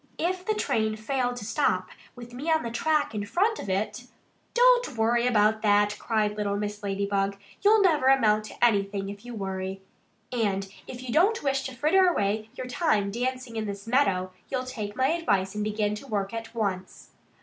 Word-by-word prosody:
"If 365 +2 -1
the 430 +2 0
train 220 - 0
failed 245 +3 -1
to 230 -4 -7
stop, 255 +7 0 0.3
with 240 -1 -11
me 280 +7 -4
on 320 -1 +3
the 235 - -4
track 305 +3 +1
in 210 -1 -2
front 400 - +1
of - - -6
it 210 +5 -2 0.2
" - - -41
"Don't - - +4
worry 235 +2 +2
about 220 -2 +3
that!" 205 -1 +3
cried 215 -2 0
little 205 -1 -1
Mrs. 210 0 -4
Ladybug. 200 0 -1 0.2
"You'll 420 +1 +5
never 305 -8 +3
amount 215 -6 +4
to 230 - 0
anything 200 -3 +1
if 200 0 -9
you 245 -1 -8
worry. 190 -1 -4 0.5
And 200 -5 0 0.2
if 250 0 -8
you 245 -2 -4
don't 395 +6 +3
wish 275 -1 +1
to 260 - -9
fritter 355 +8 +4
away 215 - 0
your 255 - -5
time 220 - +1
dancing 250 0 -3
in 215 -1 -2
this 200 0 -6
meadow, 200 -7 +1 0.2
you'll 260 -1 -1
take 215 -5 -5
my 260 +1 +2
advice 200 - 0
and 210 0 -2
begin 210 0 0
to 210 +6 -8
work 200 -3 -2
at 230 0 -6
once." 190 -4 -3
225 Hz, 195 wpm, -27 LUFS, 205-265 Hz, 0.5 s, You'll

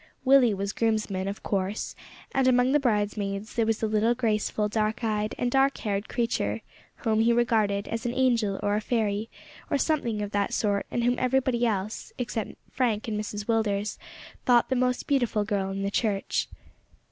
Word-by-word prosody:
Willie 255 -5 +6
was 200 +1 -3
groomsman, 215 -4 0
of 200 +1 -5
course, 195 +1 -2 0.4
and 270 -1 +2
among 250 0 +4
the 295 - +4
bridesmaids 210 -4 -1
there 230 -2 +1
was 225 0 0
a - - +3
little 220 +2 +2
graceful, 215 -3 0
dark 215 +1 -1
eyed 215 -1 -1
and 245 0 0
dark 270 +1 +3
haired 205 -1 -2
creature, 110 - -1 0.4
whom 220 -1 +2
he 230 +1 +4
regarded 220 -4 +2
as 230 0 -3
an 240 - -1
angel 235 -6 +2
or 205 - +1
a 210 - 0
fairy, 215 -2 -1 0.4
or 285 - +2
something 245 -8 0
of 205 - -5
that 205 -1 0
sort, 200 -2 0
and 240 - -1
whom 245 +1 +2
everybody 255 -2 +2
else, 210 -1 -3
except 225 -3 -3 0.2
Frank 230 -5 0
and 220 - -2
Mrs 210 -1 -4
Willders, 210 -2 0 0.4
thought 240 -2 +4
the 260 - +1
most 250 0 0
beautiful 240 -7 +1
girl 200 -2 -1
in 195 0 -3
the 200 - -1
church. 205 -3 0
220 Hz, 180 wpm, -27 LUFS, 205-240 Hz, 0.4 s, Willie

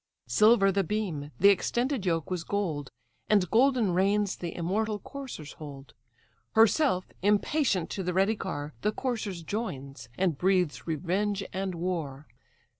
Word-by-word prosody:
Silver 195 - +5
the 195 +1 +1
beam, 175 -8 -3
the 200 - +7
extended 240 +3 +1
yoke 165 -1 0
was 180 -2 -2
gold, 165 -8 -2 0.4
And 205 -4 +4
golden 240 -5 +3
reins 200 +2 +2
the 170 -2 -6
immortal 210 +5 -1
coursers 240 - -8
hold. 140 -3 -10 0.6
Herself, 225 -3 +4 0.2
impatient, 205 - +1
to 195 - -3
the 180 -1 -1
ready 195 +4 +2
car, 150 -7 -5
The 210 +1 +1
coursers 215 -10 -3
joins, 140 - -5
and 175 -7 0
breathes 180 -5 +1
revenge 190 +6 -1
and 190 -1 -2
war. 165 -5 -3
190 Hz, 135 wpm, -28 LUFS, 165-210 Hz, 0.6 s, the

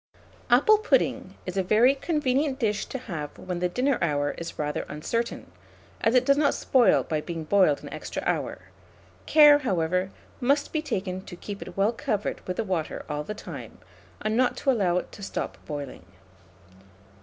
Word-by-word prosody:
Apple 290 - +6
pudding 435 - +1
is 180 +1 -5
a - - +3
very 220 +8 +4
convenient 280 -2 0
dish 215 -5 -1
to - - -4
have 160 - -6
when 180 -1 -5
the 180 0 0
dinner 255 +7 +1
hour 145 -3 +1
is 170 - -7
rather 150 0 -2
uncertain, 230 +11 -3 0.5
as 225 +3 +3
it 250 0 +4
does 280 +1 +4
not 285 -2 +3
spoil 245 -7 +4
by 155 -1 -2
being 165 0 -5
boiled 170 -3 +3
an - - -8
extra - - -5
hour; - - -2 0.6
care, 295 -2 +8
however, 185 - 0 0.3
must 280 +3 +1
be 310 - +1
taken 190 -9 -3
to - - -9
keep 200 +3 -8
it - - -9
well 205 +4 +3
covered 210 -2 -2
with 180 - -3
the - - 0
water 185 -6 -3
all 150 0 -2
the 210 - -6
time, 140 - -9 0.5
and 215 0 0
not 250 +1 +2
to 275 - +2
allow 190 -8 +2
it - - -4
to - - -12
stop 195 - -4
boiling. 145 - -6
200 Hz, 180 wpm, -26 LUFS, 170-255 Hz, 0.6 s, care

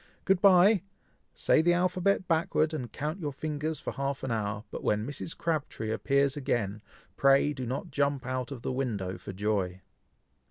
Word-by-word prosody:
Good 190 -1 +3
bye! 195 +1 +6 0.5
Say - - +3
the 175 +2 +4
alphabet 185 +2 +1
backward, 160 -1 +1
and 125 -7 -4
count 155 +5 -4
your 150 -4 -3
fingers 150 +2 -3
for - - -4
half 140 0 -3
an 130 - -2
hour, 105 -2 -2
but - - -6
when 105 +1 +1
Mrs. 145 +4 -5
Crabtree 150 -9 -2
appears 140 +4 +1
again, 110 -7 -1 0.4
pray 140 +2 +4
do 130 -3 -5
not 135 +7 -4
jump 140 -1 0
out 130 -1 -2
of 125 -4 -7
the - - -1
window 105 -8 -2
for - - -7
joy." 95 -2 -1
140 Hz, 170 wpm, -29 LUFS, 115-160 Hz, 0.5 s, bye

